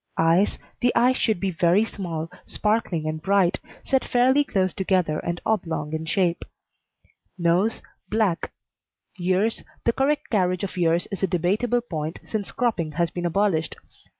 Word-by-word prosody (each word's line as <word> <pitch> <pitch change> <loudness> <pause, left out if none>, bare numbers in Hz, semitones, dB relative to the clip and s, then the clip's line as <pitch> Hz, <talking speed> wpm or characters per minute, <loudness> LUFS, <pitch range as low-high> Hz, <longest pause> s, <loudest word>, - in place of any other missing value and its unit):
EYES 165 +5 +3 0.2
The 245 - +3
eyes 250 +2 +4
should 220 -6 +1
be 195 0 -1
very 175 +5 +3
small, 170 -6 -5 0.2
sparkling, 210 -7 0
and 155 0 -3
bright, 190 0 +2 0.2
set 265 -1 +1
fairly 260 +4 +3
close 190 -8 0
together 185 -5 +1
and 170 0 -3
oblong 165 -8 -1
in 160 0 -3
shape. 175 -1 +1 0.9
NOSE 180 +5 +1 0.3
Black. 210 -6 0 0.7
EARS 185 +5 +1 0.2
The 235 - +3
correct 285 +3 0
carriage 185 -4 +1
of 200 - -4
ears 170 -1 +1
is 195 - -4
a 195 - +2
debatable 205 +8 +1
point 160 -8 -4
since 210 -3 -3
cropping 195 -11 -1
has 170 +1 0
been 175 -1 -2
abolished. 175 -3 +1
185 Hz, 150 wpm, -24 LUFS, 170-220 Hz, 0.9 s, eyes